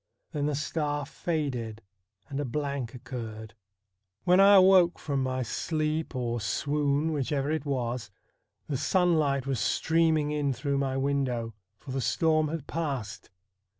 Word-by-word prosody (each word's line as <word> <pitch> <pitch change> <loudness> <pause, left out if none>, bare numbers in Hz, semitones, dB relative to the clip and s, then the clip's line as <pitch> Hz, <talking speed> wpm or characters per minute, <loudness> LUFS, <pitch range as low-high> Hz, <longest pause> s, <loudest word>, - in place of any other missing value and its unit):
Then 145 -1 -1
the 150 - 0
star 145 -1 -2
faded 130 -10 -3 0.4
and 140 0 -4
a - - 0
blank 140 -2 -3
occurred. 115 -3 -7 0.7
When 180 +1 +5
I 200 +1 +8
awoke 185 -2 +6
from 140 -3 -2
my 130 0 -1
sleep 155 +4 -2
or 120 -2 -2
swoon, 145 +7 0
whichever 140 0 -1
it 155 -2 -2
was, 125 -4 -2 0.6
the 140 - -1
sunlight 145 -3 +2
was 135 -4 -1
streaming 160 0 +2
in 145 -2 0
through 140 +3 -1
my 135 -1 -1
window, 135 -4 -1 0.2
for 140 - -10
the 135 0 -1
storm 155 +4 +2
had 155 -2 -4
passed. 135 -12 -4
140 Hz, 140 wpm, -28 LUFS, 130-155 Hz, 0.7 s, I